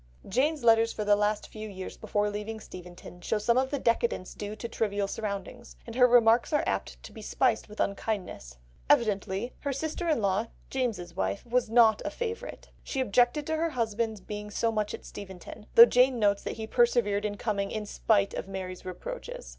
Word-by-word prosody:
Jane's 280 +7 +1
letters 225 0 +5
for 210 - -4
the 205 0 +5
last 210 0 0
few 215 0 -8
years 190 -2 -7
before 205 0 -1
leaving 210 +2 -5
Steventon 180 -2 -11
show 215 - 0
some 235 +3 +2
of 260 0 0
the 285 - -1
decadence 230 -6 0
due 205 +1 -6
to 235 - -6
trivial 205 -3 -1
surroundings, 210 +3 -5
and 230 - -8
her 250 0 +6
remarks 235 -1 +5
are 295 - +2
apt - - -3
to - - -10
be 220 - -10
spiced 230 +1 0
with 210 - -12
unkindness. 190 - -3 0.3
Evidently 205 +1 +1
her 280 - -2
sister 315 +5 -3
in 310 - +2
law, 200 +2 +1 0.2
James's 220 -10 -2
wife, 195 +3 -2
was 240 -1 0
not 225 -2 +5
a - - -2
favourite; 475 +1 -6
she 270 - -4
objected 250 +4 +2
to 315 +1 -1
her 330 +1 0
husband's 225 -5 -2
being 210 +1 -6
so 225 +2 0
much 215 -1 -1
at - - -14
Steventon, 195 +2 -10
though 230 - +12
Jane 250 +1 +3
notes 205 -2 +2
that - - -5
he 220 - -4
persevered 225 -3 +2
in 205 -1 -3
coming 200 -3 -1
"in 215 -1 -4
spite 205 -1 +1
of - - -5
Mary's 185 -2 -6
reproaches." 180 - -7
220 Hz, 195 wpm, -28 LUFS, 200-240 Hz, 0.3 s, though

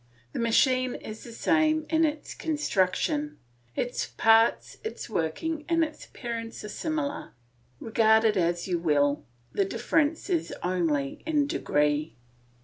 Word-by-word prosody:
The - - -3
machine 255 +2 +3
is 215 0 -8
the 235 - -10
same 315 +4 +2
in 325 0 +3
its 300 -1 -3
construction; 295 - 0 0.4
its 245 - -2
parts, 225 +1 +3
its 440 - -6
working, 300 - -2
and 330 -1 +3
its 310 -1 -5
appearance 230 -2 -6
are 210 - -6
similar. 295 +4 -3 0.5
Regard 220 0 +4
it 220 -2 +3
as 175 -1 0
you 175 -2 0
will 145 -3 +2 0.3
the 200 - +1
difference 290 +10 0
is 350 -4 -1
only 165 -6 0
in 300 -2 +2
degree. 150 - 0
230 Hz, 135 wpm, -27 LUFS, 185-305 Hz, 0.5 s, Regard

